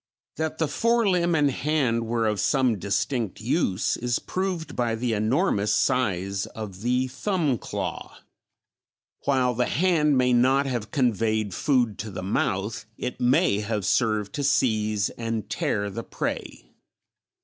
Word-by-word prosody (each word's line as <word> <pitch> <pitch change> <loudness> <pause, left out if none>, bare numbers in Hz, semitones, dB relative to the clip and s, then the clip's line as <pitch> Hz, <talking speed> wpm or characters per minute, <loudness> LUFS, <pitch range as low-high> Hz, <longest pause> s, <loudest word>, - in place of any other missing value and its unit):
That 160 0 -2
the 160 - +1
fore 230 +8 +2
limb 175 -2 +2
and 145 -3 +3
hand 125 -6 0
were 115 0 0
of 105 -2 0
some 125 -2 +2
distinct 100 +3 -1
use 110 - 0
is 120 0 0
proved 180 -5 -3
by 120 -2 0
the 120 0 -1
enormous 110 - +1
size 100 -5 0
of 100 -4 -8
the 125 +2 +1
thumb 145 - -1
claw; - - -5 1.1
while 130 -3 +2
the 125 +1 0
hand 150 -2 +2
may 125 -1 +3
not 130 +3 +4
have 120 -6 -3
conveyed 110 -5 0
food 125 - +1
to 110 - -4
the 95 -2 -6
mouth, 100 +2 -1
it 125 - -5
may 125 - +3
have 105 -2 -2
served 110 -4 +1
to 145 - -2
seize 110 -6 +1
and 115 -2 -4
tear 100 -1 -1
the 115 +4 -5
prey. - - -5
120 Hz, 145 wpm, -25 LUFS, 105-140 Hz, 1.1 s, not